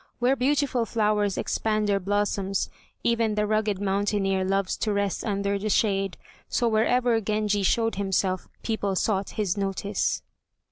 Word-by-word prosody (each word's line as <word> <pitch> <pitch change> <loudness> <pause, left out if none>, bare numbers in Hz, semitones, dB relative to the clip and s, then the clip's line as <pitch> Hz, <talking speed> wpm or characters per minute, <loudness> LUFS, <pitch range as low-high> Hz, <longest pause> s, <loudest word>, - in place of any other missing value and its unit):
Where 250 +2 +3
beautiful 265 -2 +1
flowers 210 -3 +1
expand 215 -1 0
their 200 -1 +2
blossoms 200 0 -1 0.3
even 230 -2 +1
the 210 0 +1
rugged 215 -2 0
mountaineer 195 -1 0
loves 195 0 0
to 215 - -1
rest 200 -1 -1
under 200 -1 -1
their 215 +2 -2
shade, 195 -3 +1 0.3
so 240 - +1
wherever 230 +1 +2
Genji 210 -1 0
showed 225 +2 +1
himself 190 -2 0
people 205 -4 -1
sought 195 0 0
his 205 -3 0
notice. 200 0 -1
205 Hz, 140 wpm, -26 LUFS, 195-220 Hz, 0.3 s, Where